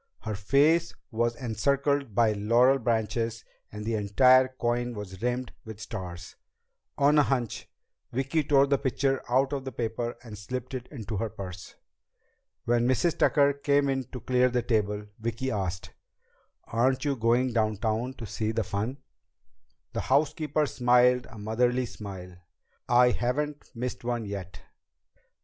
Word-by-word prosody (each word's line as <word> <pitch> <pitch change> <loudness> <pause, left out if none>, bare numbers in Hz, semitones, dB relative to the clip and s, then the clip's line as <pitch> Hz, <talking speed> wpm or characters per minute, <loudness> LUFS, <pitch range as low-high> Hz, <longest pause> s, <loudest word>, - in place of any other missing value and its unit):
Her 110 - -4
face 145 +11 +2 0.2
was 120 +1 0
encircled 140 +1 0
by 115 -2 +4
laurel 120 +6 +3
branches 115 0 -1 0.3
and 105 0 -7
the 115 - -1
entire 125 +5 +5
coin 120 -1 -2
was 95 -2 -8
rimmed 125 +1 -2
with 110 -2 -9
stars. 90 -6 -7 0.6
On 145 +2 +4
a - - +8
hunch, 125 -5 -2 0.4
Vicki 135 +5 0
tore 140 -1 +4
the 140 -1 +1
picture 135 0 0
out 135 +3 +2
of 135 -2 -2
the 130 - -5
paper 115 0 -3
and 115 -3 -9
slipped 125 +5 -5
it 125 -1 -5
into 115 -6 -6
her 110 +4 -2
purse. 95 -3 -9 0.9
When 120 0 +2
Mrs. 140 +6 +2
Tucker 140 -1 +4
came 140 0 +1
in 135 -1 -1
to 125 +1 -9
clear 125 0 +2
the 125 -1 0
table, 105 -3 0
Vicki 115 +4 -2
asked, 95 -4 -3 0.7
"Aren't 130 +5 0
you 140 -1 +1
going 120 +2 +2
downtown 110 +3 0
to 120 - -7
see 110 +2 -2
the 115 0 -1
fun?" 105 +7 -3 1.0
The - - -1
housekeeper 150 +2 +1
smiled 125 -1 +3
a 115 - -12
motherly 120 +4 +1
smile. 95 -5 -9 0.5
"I 125 0 +6
haven't 145 +5 -2
missed 125 +1 -4
one 120 -2 -2
yet." 100 -2 -7
120 Hz, 145 wpm, -28 LUFS, 110-130 Hz, 1.0 s, a